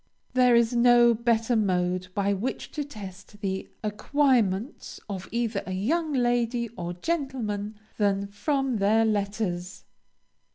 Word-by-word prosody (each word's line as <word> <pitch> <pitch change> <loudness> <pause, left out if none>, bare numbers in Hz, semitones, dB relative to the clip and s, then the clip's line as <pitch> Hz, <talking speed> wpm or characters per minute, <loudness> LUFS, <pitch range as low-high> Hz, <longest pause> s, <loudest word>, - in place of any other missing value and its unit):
There 250 -1 +5
is 235 0 +3
no 240 0 +6
better 230 +1 +1
mode 185 -3 0
by 200 0 +1
which 215 +7 -4
to 300 - -3
test 205 -6 -10
the 190 -2 -3
acquirements 230 0 0
of 195 -3 -6
either 230 -3 -1
a 185 - -3
young 305 - 0
lady 240 -2 +1
or 175 -6 -5
gentleman 215 - -3 0.2
than 200 -1 +2
from 265 +5 -1
their 215 +3 +3
letters. 200 -4 -2
220 Hz, 125 wpm, -26 LUFS, 200-245 Hz, 0.2 s, no